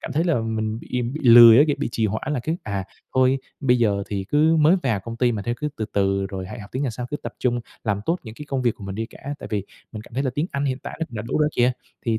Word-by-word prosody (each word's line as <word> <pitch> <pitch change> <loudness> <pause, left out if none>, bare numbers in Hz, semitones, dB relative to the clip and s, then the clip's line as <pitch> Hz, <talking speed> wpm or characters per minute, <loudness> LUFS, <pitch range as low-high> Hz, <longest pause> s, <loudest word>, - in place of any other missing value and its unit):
cảm - - -6
thấy 160 +3 +1
là 170 -9 +2
mình 110 -1 -2
bị 125 +1 -3
bị 130 +6 -4
lười 120 -2 +9
á, 145 - +7
kiểu, 145 - 0
bị - - -1
trì 110 - +1
hoãn 110 +8 -3
là 130 - -1
cái, 160 +6 -1
à, 100 -3 -3 0.3
thôi 130 +1 +4 0.2
bây 125 -3 +3
giờ 100 -4 +2
thì 100 -2 -3
cứ 155 +8 +3
mới 160 +4 +5
vào 115 -8 0
công 115 +4 -7
ty 120 0 +2
mà 105 -3 -3
thôi, 120 +3 -2
cứ 150 - -1
từ 110 - -2
từ 100 -1 +1
rồi 95 -1 -6
hãy 115 - -8
học 100 - -11
tiếng 130 - -2
Nhật 130 -5 -1
sau 120 +2 -5
cứ 145 - -2
tập - - -7
trung 120 -1 0 0.2
làm 100 -2 0
tốt 170 +2 +1
những 110 - -9
cái 150 - -9
công 135 -2 -1
việc 120 -3 +2
của 100 - -11
mình 95 0 -5
đi 110 +2 -3
cả - - -16 0.2
tại - - -8
vì 100 -3 -1 0.3
mình 110 -1 -7
cảm 115 - -16
thấy 135 - 0
là 130 - 0
tiếng 150 +3 0
Anh 140 0 -2
hiện 130 -2 -1
tại - - -8
nó - - +1
cũng 115 - -9
đã 110 - -3
đủ 115 - -2
rồi 150 - +3
kìa 125 +1 +4 0.3
thì 115 -1 +1
120 Hz, 320 wpm, -23 LUFS, 110-135 Hz, 0.3 s, lười